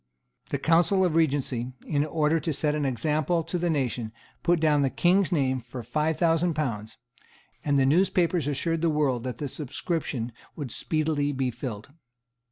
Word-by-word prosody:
The - - -1
Council 170 +6 +3
of 175 - +1
Regency, 135 -6 0
in 145 -2 +1
order 155 +1 +2
to 160 0 -2
set 150 +1 0
an 150 -1 -1
example 155 +5 0
to 165 +2 -3
the 175 0 0
nation, 125 -7 -1 0.3
put 175 0 +2
down 150 -2 +3
the 135 - +2
King's 175 - +2
name 130 -5 +1
for 125 0 -8
five 150 +6 0
thousand 165 0 +2
pounds; 115 -8 -3 0.7
and 145 -1 +2
the 135 - +4
newspapers 170 0 +2
assured 160 +3 -1
the 165 - +3
world 140 -6 +1
that 125 -3 -4
the 145 - -3
subscription 140 -3 -3 0.2
would 140 -6 -5
speedily 155 -1 0
be 130 -2 -1
filled. 115 -2 -6
150 Hz, 170 wpm, -27 LUFS, 130-165 Hz, 0.7 s, the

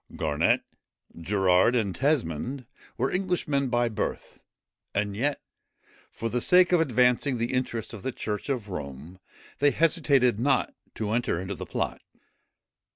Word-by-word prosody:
Garnet, 75 - +1 0.5
Gerard, 95 +5 +3
and 105 -6 0
Tesmond, 130 - -1 0.3
were - - 0
Englishmen 170 -8 0
by 120 0 +2
birth; 110 -2 -4 0.6
and 100 0 -1
yet, 140 +6 0 0.7
for 115 - -4
the 120 +2 -1
sake 180 +4 +5
of 175 -2 +4
advancing 125 -1 +2
the 120 +2 -2
interests 125 -3 -2
of 110 - -8
the 130 - -3
church 105 +1 -4
of 120 -7 -2
Rome, 75 +1 -7 0.4
they 145 - +5
hesitated 140 - +2
not 135 0 +1 0.2
to 105 -1 -3
enter 120 -6 0
into 95 +2 -4
the - - -7
plot. - - -3
120 Hz, 140 wpm, -27 LUFS, 100-140 Hz, 0.7 s, sake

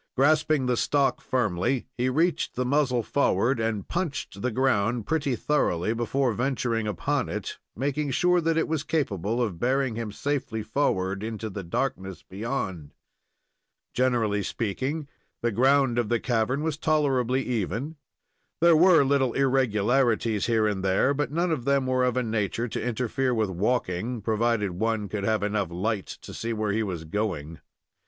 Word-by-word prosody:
Grasping 150 0 +3
the 125 -1 +1
stock 140 -2 +1
firmly, 120 +1 0
he 125 +1 0
reached 165 +6 0
the 125 - -1
muzzle 130 -3 +1
forward, 120 -2 +1
and 110 -3 -2
"punched" 140 - -3
the 125 - 0
ground 115 -2 +1
pretty 150 -5 0
thoroughly 110 - 0
before 120 +2 0
venturing 120 -3 -1
upon 105 -5 -1
it, - - -5 0.2
making 145 +4 -1
sure 180 +6 +3
that 165 0 +1
it 160 - +1
was 160 -2 -1
capable 115 - -1
of 105 -9 -1
bearing 130 +1 +1
him 115 -1 -4
safely 115 -3 -2
forward 95 -7 0
into 110 -1 -4
the 100 - -5
darkness 95 - -3
beyond. 95 - -4 1.0
Generally 115 -5 +1
speaking, 130 +10 -3 0.4
the 120 - +2
ground 130 +1 +3
of 115 -3 -1
the 120 - +2
cavern 125 +4 0
was 155 -2 -2
tolerably 135 -5 +1
even. 120 - -2 0.6
There 170 0 +6
were 170 -1 +6
little 135 -3 +2
irregularities 120 -4 +2
here 115 -2 +2
and 100 -3 -1
there, 95 +8 +2
but 145 -2 -2
none 170 +3 0
of 150 -7 -1
them 140 0 +2
were 130 0 +2
of 125 0 0
a 125 - +2
nature 110 +1 -1
to - - -4
interfere 125 +2 -1
with 110 -4 0
walking, 105 +2 -1
provided 110 -2 +1
one 110 +3 -1
could 100 -2 -3
have 110 -1 +1
enough 105 -3 0
light 95 +4 -2 0.2
to - - -9
see 115 0 -3
where 110 -2 -1
he 110 +2 0
was 90 -6 -3
going. 80 -4 -3
120 Hz, 160 wpm, -26 LUFS, 105-135 Hz, 1.0 s, There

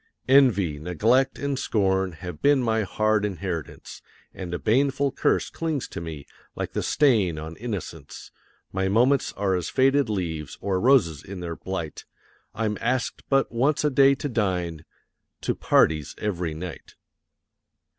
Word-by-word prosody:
Envy, 105 - +4
Neglect, 115 - +2
and 140 -2 -2
Scorn 95 -5 +1
have 90 -1 -8
been 140 -2 +4
my 110 -1 +1
hard 110 +1 +1
inheritance; 90 -5 -5 0.3
And 90 -2 -7
a 85 - -1
baneful 135 +6 +1
curse - - 0
clings 160 -5 -2
to - - -6
me, 80 -4 -7 0.3
like - - -4
the - - -1
stain 110 - +2
on 80 +2 -7
innocence; 110 -6 -7 0.4
My 95 0 0
moments 125 +8 +3
are 100 -1 0
as 90 -3 -2
faded 135 -1 +3
leaves, 80 -8 -3
or 95 -2 -1
roses 110 - +3
in 95 -1 -8
their 85 -2 -5
blight 85 -5 -5 0.5
I'm 105 -2 -1
asked 125 +1 -1
but 135 -1 +2
once 140 +7 +1
a 150 - +2
day 135 +1 +5
to 145 - -4
dine 90 - -2 0.6
to - - 0
parties 75 -3 +2
every 90 -6 -2
night. 85 +1 -8
100 Hz, 145 wpm, -25 LUFS, 85-130 Hz, 0.6 s, day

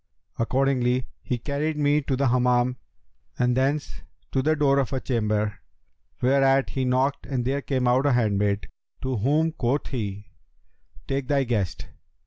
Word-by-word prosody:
Accordingly 125 0 +1 0.2
he 125 - -2
carried 150 +5 -2
me 145 0 +3
to 135 -1 -1
the 135 0 +1
Hammam 125 0 +2 0.6
and 125 0 +2
thence 130 - -1 0.3
to 135 - +1
the 155 +3 +2
door 140 -2 +3
of 135 - -1
a 130 - 0
chamber, 105 -4 -1 0.6
whereat 135 +1 +3
he 130 -1 -1
knocked 130 +2 0
and 125 -3 -2
there 140 +2 0
came 130 -3 -1
out 130 +3 +3
a 140 - +3
handmaid, 100 -4 +1 0.4
to 130 -1 -1
whom 150 +9 +2
quoth 140 -2 -1
he, 105 -5 -5 0.8
'Take 135 -1 -2
thy 140 -2 +2
guest!' 105 -9 -2
130 Hz, 150 wpm, -25 LUFS, 120-140 Hz, 0.8 s, me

